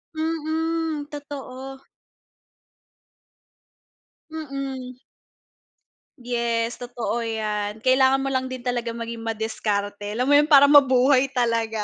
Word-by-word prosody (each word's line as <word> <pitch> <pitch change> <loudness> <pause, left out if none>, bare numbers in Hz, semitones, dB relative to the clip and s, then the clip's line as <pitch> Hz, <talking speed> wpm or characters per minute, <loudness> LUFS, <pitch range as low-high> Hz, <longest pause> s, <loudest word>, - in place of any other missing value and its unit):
Mm, 320 -1 -2
totoo. 270 -2 -8 2.5
Mm. 275 -4 -6 1.2
Yes, 235 -1 -2
totoo 240 -1 -3
'yan. 215 -2 -3
Kailangan 265 +1 +4
mo 270 - -2
lang 260 0 -1
din 255 -1 -7
talaga 240 -2 -2
maging 230 0 -6
madiskarte 210 -2 -3
alam 250 - 0
mo - - +6
'yon 295 - +2
para 285 -3 +7
mabuhay 275 -2 +5
talaga. 230 -4 -1
255 Hz, 95 wpm, -23 LUFS, 230-275 Hz, 2.5 s, para